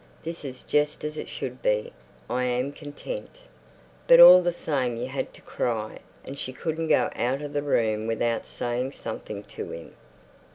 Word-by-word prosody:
This 165 0 -6
is 130 -3 -7
just 150 0 0
as 150 0 -3
it - - -6
should 125 0 -6
be. 105 -7 0 0.3
I 125 0 0
am 125 +2 0
content. 330 - -8 0.7
But - - +8
all 340 - +11
the 175 0 +1
same 135 -8 -1
you - - -3
had - - -4
to - - -17
cry, 110 -3 -3 0.3
and 140 +1 -8
she 130 - -5
couldn't 160 +4 -3
go 125 -5 +3
out 130 +4 -1
of 145 0 -6
the 145 - 0
room 110 -6 +1
without 115 +1 -1
saying 125 +3 -3
something 105 -2 -6
to - - -8
him. 85 - -9
130 Hz, 175 wpm, -26 LUFS, 120-150 Hz, 0.7 s, all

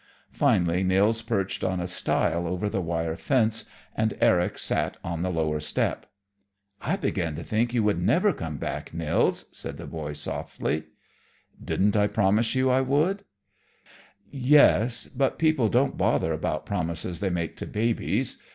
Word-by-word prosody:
Finally 85 0 +2
Nils 100 +5 +2
perched 100 -5 -2
on 95 -1 0
a 90 - -2
stile 85 -1 0
over 90 +4 -2
the 100 -2 -1
wire 80 -1 -2
fence, 115 - +1 0.3
and 110 -1 0
Eric 90 0 +3
sat - - -1
on 85 -1 -3
the 90 - -1
lower 80 -3 0
step. 75 - -1 0.7
"I 160 +9 0
began 90 - -2
to - - -6
think 115 +2 0
you 120 -3 +1
never 165 - +2
would 180 - -2
come 80 -3 -5
back, 70 - -5
Nils," 80 -2 +1
said - - -7
the - - -8
boy 75 -2 -5
softly. 75 +1 -3 0.8
"Didn't 100 +2 +1
I 105 -1 +4
promise 105 +3 +2
you 130 0 +2
I 130 +1 +3
would?" 155 +10 +1 1.1
"Yes; 130 -4 +4
but 135 0 -1
people 155 -8 +2
don't 130 +5 +1
bother 80 - +2
about 75 0 -2
promises 85 -2 -3
they 100 -1 0
make 85 -3 -2
to - - -5
babies. 115 +2 -1
100 Hz, 155 wpm, -26 LUFS, 85-120 Hz, 1.1 s, I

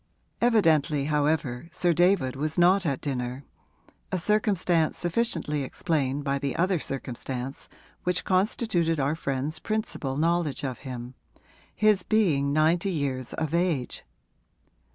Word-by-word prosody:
Evidently, 160 - +3
however, 150 -2 0
Sir 175 -1 +1
David 175 -6 +3
was 150 +4 -3
not 180 +1 +4
at 140 -3 -1
dinner, 130 -1 -3 0.7
a 185 - 0
circumstance 185 -4 +1
sufficiently 170 -6 -1
explained 140 -1 -1
by 140 0 0
the 140 -1 -2
other 180 0 +1
circumstance 130 -1 -5 0.3
which 180 0 0
constituted 185 -4 +1
our 140 +2 +1
friend's 140 0 -3
principal 215 -11 -3
knowledge 160 -3 0
of 130 -3 -3
him 125 -2 -7 0.6
his 215 -3 +4
being 165 -11 +2
ninety 160 +6 +2
years 135 -7 -2
of 160 -1 -3
age. 170 -7 0
155 Hz, 120 wpm, -27 LUFS, 140-180 Hz, 0.7 s, not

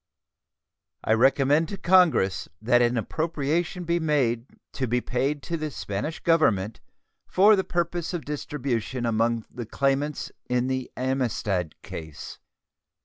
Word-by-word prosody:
I 110 - +2
recommend 135 +6 +3
to 200 - -5
Congress 170 - +3
that 120 +2 +3
an 120 0 +2
appropriation 160 - -1
be 170 0 0
made 135 -7 +1 0.3
to 130 - -2
be 120 +2 +1
paid 135 +4 -1
to 170 - -2
the 155 -1 -3
Spanish 120 +4 -4
Government 115 - +2 0.5
for 205 +3 +6
the 190 - 0
purpose 175 -1 -2
of 175 -3 -4
distribution 130 -5 -3
among 115 0 +1
the 120 -3 -6
claimants 140 +4 -1 0.2
in 125 0 +1
the 130 -1 -2
Amistad 120 - -1
case. 80 -3 -8
135 Hz, 130 wpm, -26 LUFS, 115-160 Hz, 0.5 s, for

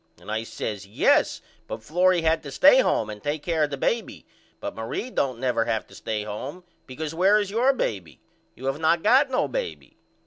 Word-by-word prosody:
And - - -9
I 110 +1 -1
says 105 -3 -5
Yes 100 - +2 0.2
but 110 - -6
Florrie 180 +5 +2
had 160 0 +2
to 140 - -8
stay 270 - +6
home 110 - +1
and 105 -1 -9
take 145 +3 -3
care 160 -3 +1
of - - -7
the 140 - -4
baby 225 - -2 0.3
but - - -5
Marie 115 - -5
don't 130 - -1
never 120 -3 +1
have 110 - -1
to - - -18
stay 105 -1 -4
home 130 - -6 0.2
because 150 +4 -5
where 190 +5 +4
is 205 -2 -1
your 240 +5 +3
baby? 95 - -4 0.4
You 130 - -10
have 135 +2 -1
not 160 +1 +2
got 265 +6 +5
no 255 - +1
baby. - - -5
150 Hz, 205 wpm, -25 LUFS, -, 0.4 s, stay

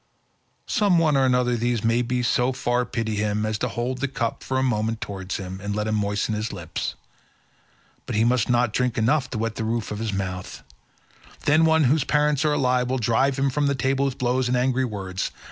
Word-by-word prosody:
Some 205 -6 +2
one 160 -3 +3
or 135 -1 +4
other 125 0 +1
of 120 - -1
these 120 -1 0
may 115 +2 +2 0.2
so 125 +2 +2
far 125 -1 0
pity 110 -2 -3
him 105 0 0
as 110 -1 -2
to - - 0
hold 125 +2 -3
the 140 - 0
cup 120 -4 -3
for 130 - -2
a 130 - +2
moment 115 -3 0
towards 95 -3 -5
him 95 0 -7
and 100 +1 -3
let 105 0 -1
him 110 - -1
moisten 105 0 0
his 105 +1 -2
lips, - - -4 1.1
but - - -3
he 110 - +3
must 120 -1 +2
not 120 -2 +2
drink 125 0 0
enough 125 +4 +2
to - - -4
wet 115 0 -2
the - - -2
roof 115 -1 -2
of 105 - -4
his 110 -1 -2
mouth; 95 -2 -5 0.8
then 155 +2 +5
one 160 -1 +4
whose 145 +2 +3
parents 150 -1 +2
are 150 -1 +2
alive 125 -3 +1
will 130 - 0
drive 130 +4 +1
him 135 0 +1
from 145 +2 +1
the 140 - +1
table 135 +1 0
with 135 -2 -2
blows 125 0 +1
and 125 0 +1
angry 130 +1 +1
words. 95 -5 -4
120 Hz, 220 wpm, -24 LUFS, 110-130 Hz, 1.1 s, then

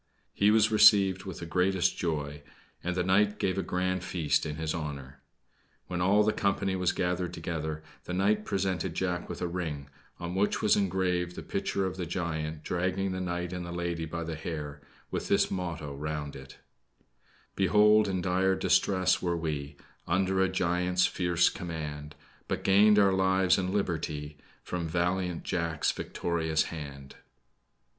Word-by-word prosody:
He 100 - +3
was 110 +1 +4
received 100 -3 +6
with 95 -3 -7
the - - -4
greatest 90 +1 +1
joy; 75 -4 -3 0.4
and 90 +1 -2
the 90 - +1
knight 100 +3 +3
gave 95 0 0
a - - +2
grand 90 0 -1
feast 75 -5 0
in 75 - -4
his 80 0 -2
honor. 70 -4 -6 0.6
When 90 -1 -3
all 100 +4 +4
the 105 0 +2
company 100 -1 0
was 90 -1 +1
gathered 90 0 -2
together, 80 -2 -4 0.2
the 90 - -4
knight 105 +3 +2
presented 95 -4 -1
Jack 90 -2 -2
with - - -5
a - - 0
ring, 80 -6 -4 0.3
on 85 0 -4
which 100 +2 +1
was 105 - +4
engraved 90 -2 0
the - - -7
picture 100 -1 -1
of 95 0 -4
the 90 -3 -3
giant 80 -3 -3
dragging 90 +3 -1
the 95 0 -3
knight 90 0 -3
and 90 -1 -4
the 85 - -6
lady 85 -1 -2
by 85 +1 -4
the 80 0 -4
hair, 75 -3 -5 0.3
with - - -3
this - - +2
motto 85 -6 -4
round 75 0 -4
it 65 0 -11 1.0
"Behold, 105 +3 +5
in 95 -2 -1
dire 95 +1 +2
distress 95 0 +2
were 85 -1 0
we, 75 -3 -4 0.3
Under 95 +2 +1
a 95 - +3
giant's 90 0 +1
fierce 85 -1 +2
command, 75 -4 -5 0.3
But - - -3
gained 105 +2 +6
our 100 -2 +5
lives 95 0 +3
and 90 -1 -1
liberty 75 -6 -2 0.2
From 85 -2 -3
valiant 90 +1 -1
Jack's 85 -3 0
victorious 80 -2 -1
hand." 70 -3 -8
90 Hz, 165 wpm, -29 LUFS, 80-95 Hz, 1.0 s, received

